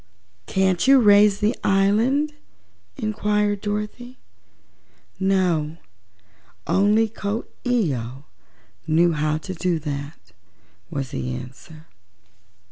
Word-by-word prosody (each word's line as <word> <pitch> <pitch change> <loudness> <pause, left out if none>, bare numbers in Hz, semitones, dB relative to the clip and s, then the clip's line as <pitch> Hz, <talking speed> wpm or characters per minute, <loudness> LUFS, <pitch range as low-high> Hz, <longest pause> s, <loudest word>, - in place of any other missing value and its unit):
"Can't 190 +2 +1
you 270 0 +7
raise 205 -2 +5
the 215 +4 +2
island?" 225 +10 +2 0.6
inquired 210 -3 0
Dorothy. 210 +5 -5 1.0
"No. 180 -5 +1 0.9
Only 205 +6 +3
Coo 215 +1 -4 0.2
ee 235 - +1
oh 125 +4 -7 0.6
knew 165 +2 +3
how 155 0 0
to 185 +4 -7
do 175 -1 -1
that," 140 - -7 0.6
was 135 -3 -4
the 65 -1 -3
answer. 155 - -11
195 Hz, 95 wpm, -22 LUFS, 155-210 Hz, 1.0 s, you